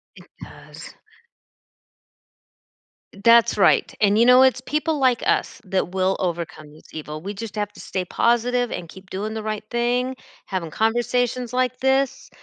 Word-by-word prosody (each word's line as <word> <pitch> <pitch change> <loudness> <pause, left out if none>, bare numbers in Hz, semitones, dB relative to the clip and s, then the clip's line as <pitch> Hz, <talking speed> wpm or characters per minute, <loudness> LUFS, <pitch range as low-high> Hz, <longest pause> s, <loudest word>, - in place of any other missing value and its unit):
It - - -15 0.2
does. - - -12 2.3
That's 230 -2 +5
right. 195 - +3
And, 205 0 +3
you 235 - +5
know, 250 +1 +7
it's 260 -1 +3
people 305 +2 -1
like 255 -3 +2
us - - 0
that 185 -1 -1
will 190 +1 0
overcome 170 -4 -4
this 155 - -19
evil. 155 0 -7
We 200 +3 -5
just 225 +1 -7
have 210 0 -2
to - - -15
stay 185 -1 -4
positive 240 +3 +1
and 170 -2 -6
keep 190 0 -14
doing 210 +3 -4
the 220 - -4
right 215 -1 -4
thing, 245 +2 0 0.3
having 180 -4 -4
conversations 240 +3 0
like 255 0 0
this, 265 0 0
225 Hz, 155 wpm, -22 LUFS, 190-250 Hz, 2.3 s, know